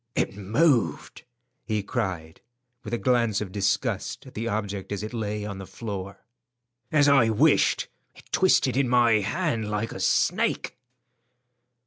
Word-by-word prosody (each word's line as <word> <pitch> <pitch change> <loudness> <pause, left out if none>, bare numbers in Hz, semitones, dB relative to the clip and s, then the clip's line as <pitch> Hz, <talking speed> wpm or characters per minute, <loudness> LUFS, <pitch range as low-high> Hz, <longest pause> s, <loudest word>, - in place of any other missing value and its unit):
"It - - -1
moved," 110 - 0 0.4
he 110 -3 -2
cried, 85 -5 -4 0.4
with 105 - -7
a 120 - 0
glance 115 -4 +1
of 105 -3 -5
disgust 100 +4 -1
at 130 - -13
the 115 +2 -4
object 105 -3 -3
as 100 0 -3
it 110 - -6
lay 105 -2 -3
on 100 -2 -6
the 95 - -8
floor. 95 -1 -7 0.7
"As 145 -2 +4
I 135 -5 +5
wished, 140 +8 +3 0.3
it - - -16
twisted 165 -9 +3
in 135 -2 +1
my 120 -3 +4
hand 115 - -1
like 105 +2 -2
a - - -7
snake." - - +1
110 Hz, 145 wpm, -25 LUFS, 100-120 Hz, 0.7 s, I